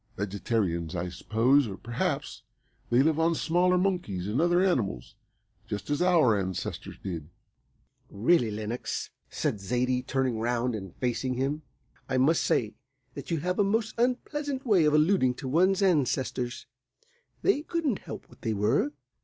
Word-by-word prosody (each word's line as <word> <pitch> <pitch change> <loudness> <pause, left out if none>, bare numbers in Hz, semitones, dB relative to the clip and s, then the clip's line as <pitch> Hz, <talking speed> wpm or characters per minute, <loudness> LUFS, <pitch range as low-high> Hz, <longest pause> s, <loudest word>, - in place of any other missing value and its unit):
Vegetarians, 95 -4 -1
I 90 +1 -2
suppose, 120 +9 +2
or 95 -2 -6
perhaps 120 0 -3 0.5
they 120 +3 +4
live 160 +1 +2
on 165 +1 +3
smaller 180 +3 +2
monkeys 180 - -1
and 105 +8 0
other 175 +2 +3
animals, 105 - 0 0.5
just 105 +6 -4
as 145 +3 0
our 170 -11 +4
ancestors 95 -2 -4
did." 85 -5 -5 0.8
"Really, 120 +4 +2
Lenox," 110 +3 -4 0.2
said 105 - -2
Zaidie, 125 +5 0
turning 130 -3 -1
round 120 +1 0
and 95 -4 -6
facing 125 +1 -1
him, 140 +4 -1 0.5
"I 130 - +1
must 150 +6 +3
say 110 -3 +1 0.4
that 140 - -8
you 165 -4 -1
have 180 +3 -1
a - - +6
most 220 +2 0
unpleasant 265 +3 -1
way 195 -9 +4
of 150 0 +3
alluding 150 -5 +3
to 130 - -6
one's 185 +8 +3
ancestors. 130 -7 0 0.8
They 390 -7 +3
couldn't 310 - -1
help - - -9
what - - -19
they 115 -3 -1
were." 115 +8 +1
130 Hz, 150 wpm, -28 LUFS, 110-175 Hz, 0.8 s, a